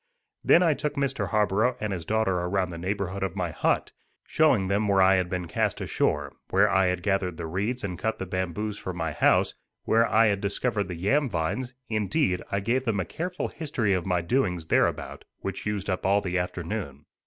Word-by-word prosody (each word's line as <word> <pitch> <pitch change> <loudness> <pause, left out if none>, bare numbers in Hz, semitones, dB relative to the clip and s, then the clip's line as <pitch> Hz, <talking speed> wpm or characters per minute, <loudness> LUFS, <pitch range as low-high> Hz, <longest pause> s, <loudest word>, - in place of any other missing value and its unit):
Then 175 - +6
I 165 -3 +4
took 145 +1 -3
Mr. 140 -1 -1
Harborough 110 +3 +2
and 105 -2 -2
his 85 -3 -5
daughter 105 -2 +1
around 90 +1 -1
the 85 - -7
neighborhood 95 +1 -3
of 95 -1 -2
my 90 -3 -2
hut, - - 0 0.3
showing 130 -12 +3
them 100 +2 +1
where 100 -1 +3
I 95 0 +6
had 90 -1 0
been 90 -1 -3
cast - - -1
ashore, 75 -2 -1 0.2
where - - +4
I 95 +1 +3
had 90 -1 -1
gathered 95 -4 0
the - - -4
reeds 105 +9 -2
and 90 -4 -4
cut 110 0 -1
the 95 - -4
bamboos 95 +3 -3
for 95 - -5
my 80 -3 -2
house, - - +3 0.3
where 115 +1 +3
I 110 +1 +4
had 100 -2 +1
discovered 100 +1 -1
the 90 - -5
yam 130 - +1
vines; 120 +9 -2
indeed, 110 - 0
I 100 - 0
gave 125 +5 0
them 110 -5 0
a 95 - -1
careful 180 - -4
history 135 -10 -1
of 90 -1 -1
my 90 -2 +1
doings 90 -4 0
thereabout, - - 0 0.2
which 95 +1 -4
used 105 -2 -2
up 95 -2 -1
all 100 +2 +3
the 90 -2 -1
afternoon. 85 -5 -4
100 Hz, 205 wpm, -26 LUFS, 90-110 Hz, 0.3 s, Then